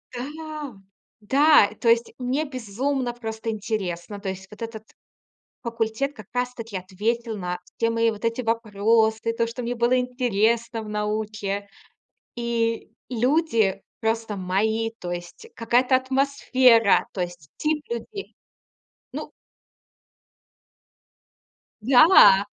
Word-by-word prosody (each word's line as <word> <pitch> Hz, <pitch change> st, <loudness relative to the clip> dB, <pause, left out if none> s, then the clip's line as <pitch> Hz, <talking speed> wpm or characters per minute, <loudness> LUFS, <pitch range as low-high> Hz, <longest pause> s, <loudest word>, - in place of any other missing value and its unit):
Да 300 Hz, +1 st, -6 dB, 0.5 s
да, 280 Hz, 0 st, +5 dB
то 230 Hz, -, +3 dB
есть 230 Hz, 0 st, +3 dB
мне 260 Hz, +5 st, -1 dB
безумно 255 Hz, +1 st, -2 dB
просто 225 Hz, -1 st, -5 dB
интересно. 200 Hz, -3 st, -4 dB
То 195 Hz, -, -3 dB
есть 190 Hz, 0 st, -7 dB
вот 210 Hz, +1 st, -14 dB
этот 225 Hz, -1 st, -6 dB, 0.8 s
факультет 230 Hz, +4 st, -2 dB
как 215 Hz, -6 st, -12 dB
раз-таки 245 Hz, -4 st, -3 dB
ответил 220 Hz, +5 st, -2 dB
на 180 Hz, -1 st, -3 dB, 0.2 s
все 230 Hz, -, +1 dB
мои 230 Hz, 0 st, +2 dB
вот 215 Hz, +1 st, -9 dB
эти 230 Hz, +2 st, -1 dB
вопросы, 220 Hz, 0 st, +1 dB
то, 230 Hz, 0 st, 0 dB
что 235 Hz, +2 st, -6 dB
мне 240 Hz, +1 st, -2 dB
было 240 Hz, +2 st, +2 dB
интересно 235 Hz, -2 st, 0 dB
в 215 Hz, -, -9 dB
науке. 210 Hz, -1 st, -2 dB, 0.7 s
И 230 Hz, -1 st, -1 dB, 0.2 s
люди 245 Hz, -, +1 dB, 0.2 s
просто 225 Hz, -1 st, -1 dB
мои. 220 Hz, +5 st, 0 dB
То 175 Hz, -1 st, -5 dB
есть 175 Hz, -, -8 dB
какая-то 245 Hz, +3 st, +2 dB
атмосфера. 260 Hz, -4 st, +3 dB
То 185 Hz, -, -5 dB
есть 175 Hz, -5 st, -5 dB
тип 305 Hz, 0 st, 0 dB
людей, 400 Hz, -, -6 dB, 0.8 s
ну -, -, -6 dB, 2.5 s
Да! 245 Hz, -, +7 dB
230 Hz, 115 wpm, -24 LUFS, 210-250 Hz, 2.5 s, Да